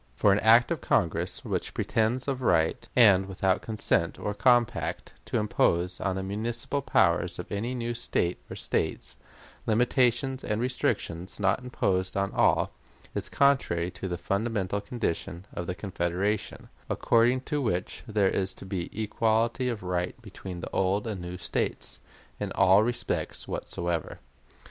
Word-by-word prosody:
For 105 - +4
an 100 - +2
act 115 +3 +5
of - - -1
Congress - - 0
which - - -3
pretends 115 +4 0
of 135 -2 -1
right, 80 -9 +1
and 100 -5 +6
without 95 0 +1
consent 110 -6 0
or 105 - -3
compact, 120 +3 +1
to - - -1
impose 90 -4 +1
on 95 -2 -1
the 95 - -3
municipal 115 +7 -2
power 90 -9 +3 0.2
of 90 - -5
any 115 +5 -2
new 120 -1 -2
State 90 -6 -1
or - - -6
States - - -2 0.5
limitations 125 +3 +2
and 105 0 -1
restrictions 100 -8 -2
not 100 +5 +1
imposed 95 -7 -1
on 100 0 0
all, - - +3 0.4
is - - -1
contrary 90 -11 +2
to 90 +1 -6
the 90 -1 -3
fundamental 100 +1 -1
condition 95 -5 -3
of 85 - -5
the 90 - -2
Confederation, 95 +1 -2 0.2
according 120 +2 +3
to 145 +2 -2
which 90 -7 -2
there 105 -3 +2
is 95 -1 -1
to - - -10
be 95 -2 -3
equality 115 +4 +1
of 115 -5 -4
right 90 +4 -2
between 95 -5 -8
the - - -6
old 95 +3 +1
and 105 -5 -4
new 90 +1 -6
States - - -3 0.4
'in - - -3
all 95 +2 +6
respects 120 +2 -2
whatsoever.'" 85 -2 -3
100 Hz, 150 wpm, -28 LUFS, 90-120 Hz, 0.5 s, and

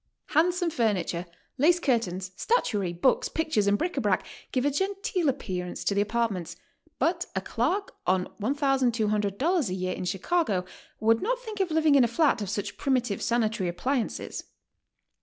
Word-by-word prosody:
Handsome 345 +2 +2
furniture, 190 - 0 0.3
lace 340 +5 +5
curtains, 190 - 0
statuary, 205 - 0
books, 175 +10 +2
pictures 310 -11 0
and 200 0 +4
bric 350 +7 -2
a - - +2
brac - - +1 0.3
give 255 0 0
a 290 - +3
gen 385 +8 0
teel 355 -9 +1
appearance 185 -9 -4
to - - +1
the 200 - +2
apartments, 205 -6 -1 0.4
but 340 +4 0
a - - +2
clerk 335 - -1 0.2
on 185 0 +2 0.2
$1200 250 - +1
a - - -2
year 185 0 -2
in - - -5
Chicago 195 - 0 0.3
would 225 +1 +3
not - - 0
think 440 -4 -8
of 380 -2 +1
living 315 -2 +3
in 275 -2 +6
a - - +4
flat 280 0 +2
of 200 - -3
such 205 0 -3
primi 265 -2 +2
tive 215 -5 -4
sanitary 225 -5 0
appliances. 250 +8 -2
235 Hz, 165 wpm, -27 LUFS, 200-320 Hz, 0.4 s, in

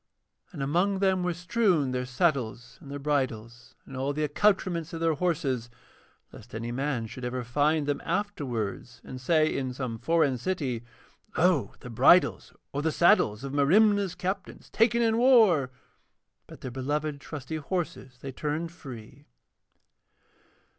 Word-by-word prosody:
And 150 -7 -5
among 180 +8 +1
them 190 -1 +2
were 180 -1 -1
strewn 180 - +1
their 125 0 -2
saddles 125 -4 -1
and 140 - -12
their 140 - -5
bridles, 120 -4 -3
and 135 - -10
all 135 +2 -1
the 155 +1 -2
accoutrements 175 +1 +1
of 165 - -4
their 165 -1 +2
horses, 145 -8 -1 0.6
lest 115 +3 -12
any 115 +2 -4
man 130 -2 -2
should 125 +3 -9
ever 125 0 -3
find 145 +5 +1
them 145 0 -1
afterwards 130 - -3
and 130 0 -9
say 155 +3 +2
in 130 -2 -2
some 125 -4 -4
foreign 150 -5 +2
city: 130 -7 -2 0.5
'Lo! 175 -4 +2
the 125 - -9
bridles 135 +10 +4 0.2
or 145 - -1
the 160 +1 0
saddles 145 - +3
of 140 0 -5
Merimna's 195 +6 +3
captains, 190 +2 -5
taken 235 +1 +3
in 225 0 +2
war,' 220 - +5 0.8
but - - -13
their 130 - -6
beloved 145 +3 -2
trusty 150 +1 -6
horses 155 -5 -4
they 135 - -6
turned 155 +5 -3
free. 125 -9 -11
145 Hz, 145 wpm, -28 LUFS, 130-175 Hz, 0.8 s, war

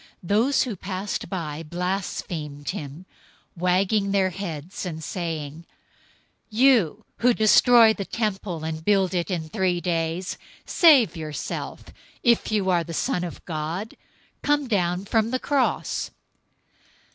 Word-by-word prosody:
027:039 - - -22 0.2
Those 230 +7 +3
who 240 -5 -4
passed 190 +2 -4
by 160 -5 -4
blasphemed 165 -4 -4
him, 160 -2 -7 0.5
wagging 190 +3 +1
their 190 -2 +2
heads, 175 -2 -6
027:040 - - -3
and 160 -1 -7
saying, 165 -2 -5 0.8
"You 220 - +3
who 245 0 +3
destroy 220 +2 +6
the 205 - -4
temple, 195 -7 -3
and 160 0 -4
build 195 -1 +2
it 175 0 -1
in 170 -4 -2
three 185 -1 0
days, 170 +1 -2 0.3
save 290 - +5
yourself! 155 -3 -5 0.4
If 235 -2 +3
you 200 -3 +1
are 175 -2 +2
the 165 0 -7
Son 175 - 0
of 175 - -7
God, 165 +6 -4 0.5
come 290 -1 +1
down 180 -4 0
from 220 +1 +1
the 255 - 0
cross!" 275 0 0
185 Hz, 135 wpm, -24 LUFS, 165-215 Hz, 0.8 s, destroy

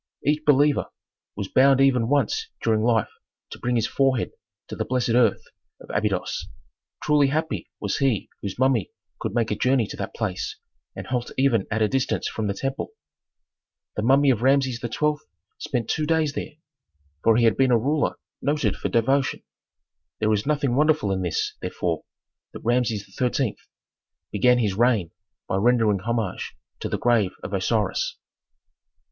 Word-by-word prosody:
Each 150 +2 +1
believer 145 0 +3 0.5
was 100 -1 -4
bound 135 +4 +4
even 130 -4 +4
once 145 - +1 0.2
during 110 -1 +2
life 115 -2 +2 0.4
to - - -8
bring 125 0 -1
his 115 - +2
forehead 135 -3 +1 0.4
to - - -5
the - - -2
blessed 125 -1 -1
earth 115 -3 +3 0.4
of - - -11
Abydos. 105 -3 -1 0.6
Truly 150 -2 +4
happy 155 +4 -2
was - - -2
he 135 -7 +1
whose 100 -1 -5
mummy 130 -6 +2 0.3
could 100 - -4
make 115 -2 +1
a - - +1
journey 125 +1 +2
to - - -8
that - - -5
place 100 -5 -3 0.4
and - - -6
halt 125 -2 -2
even 130 -7 +2
at 110 +1 +1
a - - +4
distance 130 +3 -1
from 110 -2 -3
the 100 - -2
temple. 135 - -4 1.0
The - - -1
mummy 135 +4 +4
of 115 -4 -1
Rameses 130 -1 +2
XII. 150 +5 0 0.5
spent 120 -4 -2
two 155 -1 -1
days 160 -2 +1
there; 150 - -5 0.7
for 115 -1 +5
he 120 - +3
had 115 - +4
been 135 -1 +3
a 120 - +5
ruler 145 +6 0 0.3
noted 145 +1 0
for - - -3
devotion. 135 +4 +1 0.7
There 110 0 +1
is 105 +4 -1
nothing 145 -4 +1
wonderful 150 -7 +2
in 95 -1 -1
this, 90 -3 -1
therefore, - - -2 0.5
that - - -8
Rameses 115 -4 +1
XIII. 125 -2 0 0.8
began 125 +4 +4
his 105 -5 +1
reign 110 -5 +2 0.4
by 95 - 0
rendering 110 -2 +3
homage 110 -1 -3 0.2
to - - -4
the - - -1
grave 115 -6 +2
of 100 - -6
Osiris. 100 +1 0
120 Hz, 165 wpm, -24 LUFS, 110-135 Hz, 1.0 s, for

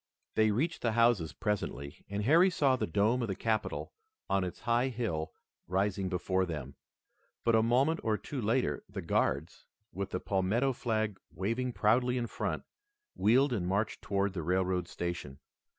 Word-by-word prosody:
They 110 0 +4
reached 135 +11 0
the 115 -2 +1
houses 115 -8 +3
presently 95 -10 -3
and 100 +1 -2
Harry 165 - +6
saw 140 -7 +3
the - - -2
dome 105 +9 +2
of 115 - -1
the 95 - -2
capitol 110 +1 -2 0.4
on 95 -1 +3
its 90 -2 -5
high 120 +2 +2
hill 110 -11 -2 0.4
rising 95 +1 0
before 95 +1 0
them, 75 -6 -5 0.7
but 115 - +3
a 110 - +5
moment 130 +8 +3
or 110 -2 +1
two 135 +3 -5
later 115 +4 0
the 100 -2 -6
Guards, 80 -1 -1 0.3
with 95 +2 -3
the 90 - -2
Palmetto 105 +9 +1
flag 110 -4 -1
waving 115 +6 -2
proudly 125 +4 +2
in 120 - 0
front, - - -3 0.5
wheeled 130 +5 +3
and 90 -6 -1
marched 100 +4 -1
toward 100 -1 0
the 90 - -3
railroad 90 +1 0
station. 85 -7 -4
105 Hz, 165 wpm, -31 LUFS, 95-120 Hz, 0.7 s, Harry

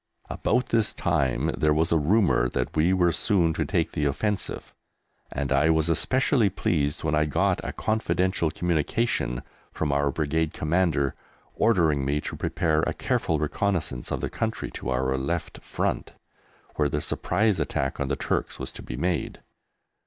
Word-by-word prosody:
About 125 +2 0
this 115 -2 +1
time 65 -3 0
there 75 -1 +2
was 80 +2 +1
a 85 - +4
rumour 85 - +3
that - - -3
we 80 +4 +3
were 90 -2 +3
soon 85 -4 +2
to - - -1
take 85 -5 0
the 75 - -1
offensive, 100 +9 -2 0.6
and 70 0 -3
I 70 +3 +4
was 80 0 +2
especially 130 - +2
pleased 75 -6 -1
when 80 -1 0
I 75 0 +3
got 75 - +1
a - - -3
confidential 95 -5 0
communication 80 - -1 0.3
from 75 -2 -1
our 70 0 +2
Brigade 80 +2 -1
Commander 80 -4 +1 0.4
ordering 80 -11 +2
me 70 +2 0
to - - -5
prepare 80 -1 0
a - - -2
careful 80 - 0
reconnaissance 75 - -1
of - - -2
the - - -2
country 110 -1 -3
to - - -5
our 65 +1 0
left 85 +6 -3
front, - - -2 0.6
where 75 -1 +2
the 75 - -1
surprise 100 +7 0
attack 65 - -2
on 70 - -1
the 70 - 0
Turks - - -2
was - - -6
to - - -9
be - - -6
made. 90 -1 -1
80 Hz, 165 wpm, -26 LUFS, 70-95 Hz, 0.6 s, a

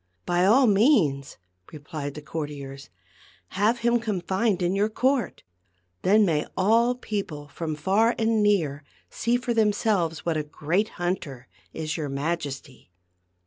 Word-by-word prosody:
" 90 - -48
By 175 +1 +3
all 255 +6 +6
means," 195 - +2 0.3
replied 145 -1 -6
the 150 - -8
courtiers, 145 -3 -6 0.3
" 90 - -28
have 220 +5 +1
him 235 0 +3
confined 195 -2 -1
in 175 +1 +1
your 205 +2 +1
court; 255 +1 0 0.6
then 210 +3 +4
may 155 -5 0
all 230 +6 +3
peo 215 -4 -3
ple 145 -4 -10
from 155 +1 -4
far 200 +9 +2
and 225 -1 +1
near 165 -9 +1 0.3
see 235 +1 0
for 245 -1 -2
themselves 205 -7 +1
what 165 -2 0
a - - 0
great 165 +7 -1
hunter 155 -8 -3 0.2
is 155 0 -4
your 150 -3 -3
Majesty. 140 - -4
180 Hz, 145 wpm, -25 LUFS, 150-220 Hz, 0.6 s, all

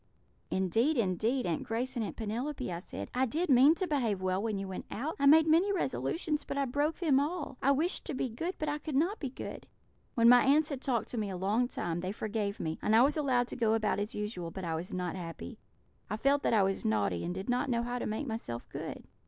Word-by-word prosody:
"'Indeed, 225 - +1
indeed, 225 +5 +1
Aunt 165 -3 -1
Grace 245 +4 -2
and 235 - -1
Aunt 205 - -5
Penelope,' 240 +3 -3
I 170 - -4
said, 180 - -7
'I 255 +1 +2
did 325 +8 -1
mean 270 +5 +7
to 375 - -1
behave 240 - 0
well 185 +1 0
when 215 -2 -1
you 195 0 -4
went 190 - -6
out; 290 +9 -3
I 280 - +4
made 315 +2 +8
many 335 +6 +4
resolutions, 330 -4 -1
but - - -5
I 280 - +2
broke 290 +5 0
them 300 -7 +3
all; 295 -3 -3
I 275 - +3
wished 310 +7 +1
to 295 - -4
be 260 - -1
good, 325 +11 -4
but 310 - -3
I 295 0 -1
could 300 -1 -5
not 345 +10 +1
be 275 - -3
good.' 250 - -8 0.5
"When 230 -1 +5
my 245 0 +8
aunts 295 +3 +4
had 275 -3 -4
talked 245 -5 -1
to 240 - -3
me 210 -2 -2
a 185 - -4
long 210 +7 +1
time, 175 -8 -3
they 185 +2 -3
forgave 210 -1 -3
me, 160 0 -3
and 220 - +2
I 230 - +7
was 285 +3 +3
allowed 260 -5 +1
to - - -5
go 225 -2 +2
about 215 -2 0
as 205 +1 -3
usual, 210 -5 -4
but 190 +3 -7
I 165 - -2
was 165 +3 -4
not 180 -1 -3
happy; 165 - -7 0.5
I 210 - -2
felt 280 +4 +2
that - - +1
I 205 - +5
was 195 0 -1
naughty, 100 -5 0
and 175 - -2
did 190 +2 -5
not 250 +2 0
know 235 -1 +1
how 245 +1 -3
to - - -3
make 220 +7 -2
myself 220 - -5
good. - - -6
240 Hz, 250 wpm, -31 LUFS, 195-285 Hz, 0.5 s, made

